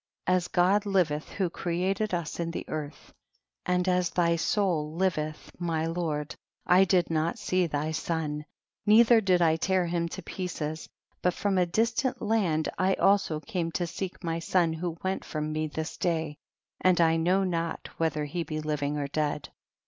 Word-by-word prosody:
44. 185 - +3
As 180 -1 0
God 195 +4 +3
liveth 165 -6 +1
who 190 -2 0
created 190 +6 -1
us 170 -3 -3
in 170 -1 -1
the 170 - -5
earth, 150 -1 -6 0.5
and 180 0 +1
as 180 -1 +2
thy 170 -1 +2
soul 165 -5 0
liveth, 155 -4 -1
my 165 -2 -1
lord, 160 -3 -2 0.3
I 185 +2 +6
did 180 -3 +2
not 160 +1 0
see 185 -1 +1
thy 150 0 -2
son, 155 -2 -2 0.4
neith 220 +3 +6
er' 230 -2 +7
did 180 -3 +3
I 160 -1 +3
tear 185 +1 +1
him 170 0 -1
to - - -7
pieces, 160 -4 -4 0.3
but 180 0 +1
from 200 -2 +1
a 180 - +3
distant 235 +6 0
land 180 -8 +1
I 190 +1 +3
also 195 -6 +3
came 165 -1 -3
to 175 - 0
seek 185 +3 -6
my 165 -1 -1
son 165 -1 +2
who 170 0 -4
went 190 0 -1
from 155 0 -3
me 155 0 -1
this 155 +2 -5
day, 160 -4 -1 0.4
and 185 -1 +3
I 165 -1 +4
know 180 +4 +2
not 170 -3 -2
whether 155 -2 0
he 170 +4 -3
be 155 -2 -3
living 150 -1 -1
or 145 - -1
dead. 150 0 -2
170 Hz, 180 wpm, -28 LUFS, 155-185 Hz, 0.5 s, er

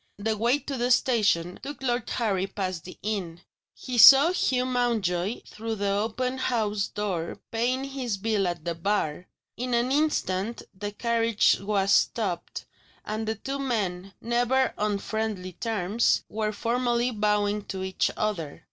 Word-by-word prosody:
The 220 +2 -1
way 235 +6 +2
to 285 -2 -5
the 245 +1 0
station 205 -9 +2
took 285 -1 -7
Lord 240 -3 -1
Harry 195 -5 0
past 185 -5 -4
the 185 - -10
inn. 185 -5 -3 0.3
He 250 -2 -3
saw 275 +8 +10
Hugh 255 -8 +1
Mountjoy 230 -6 0
through 225 +1 -5
the 200 -1 -1
open 230 +6 -1
house 210 -5 0
door 185 -5 -3
paying 245 +3 0
his 265 -6 -3
bill 205 -2 0
at 170 -3 -4
the 170 - -1
bar. 170 -2 -1 0.3
In 250 +1 -1
an 240 +2 +1
instant 235 -8 0
the 205 +1 -5
carriage 230 0 +2
was 195 -1 +1
stopped, 190 -7 0 0.4
and 215 +1 -3
the 220 - -1
two 270 +6 -5
men 195 -7 -2
(never 245 +2 +1
on 210 -1 0
friendly 205 -3 -3
terms) 220 +2 +1
were 215 0 -1
formally 240 +3 0
bowing 210 -1 0
to 190 -1 -5
each 190 0 0
other. 175 -9 -2
215 Hz, 150 wpm, -26 LUFS, 195-240 Hz, 0.4 s, saw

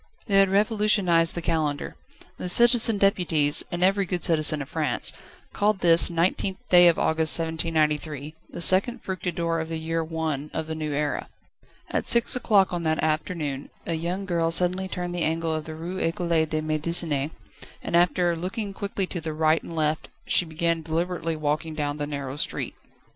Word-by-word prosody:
They 195 -2 +3
had 195 -1 +4
revolutionised 200 -5 +2
the 170 - -4
Calendar: 155 -4 -2 0.4
the 180 - -4
Citizen 235 +1 +5
Deputies, 175 -7 +3
and 175 +1 -2
every 195 +1 +2
good 180 -1 -3
citizen 155 -2 +5
of - - -14
France, 150 -5 -1 0.4
called 205 -1 0
this 170 -1 +5
19th 180 +2 -1
day 175 -1 +7
of 170 - +3
August 160 0 +4
1793 155 -3 -2 0.2
the - - -11
2nd 190 +8 +4
Fructidor 170 -3 -3
of 160 0 -5
the 165 - -3
year 165 +1 -3
I. 160 -3 -4
of 160 - -3
the 160 - -5
New 155 -1 -4
Era. 145 0 -3 0.6
At - - -2
six 235 +1 +5
o'clock 200 -7 +2
on 175 - -2
that 160 -1 -1
afternoon 155 -3 -3 0.2
a 170 - -2
young 175 +4 -3
girl 170 -3 -1
suddenly 180 +3 +2
turned 180 -1 -5
the 175 - -3
angle 165 0 -1
of 155 -1 -4
the 160 - -8
Rue 175 +4 -6
Ecole 170 +1 -2 0.2
de 155 0 -2
Médecine, 155 -2 0 0.5
and - - -3
after 175 0 +2
looking 195 +4 -5
quickly 200 0 -3
to 180 -2 -6
the 160 -1 -5
right 155 +1 +1
and 165 - -9
left 155 0 -1 0.2
she 180 - +2
began 165 +1 -2
deliberately 165 +1 -3
walking 155 +1 -3
along 145 0 -2
the 145 -1 -4
narrow 140 -2 -6
street. - - -3
165 Hz, 175 wpm, -24 LUFS, 155-180 Hz, 0.6 s, day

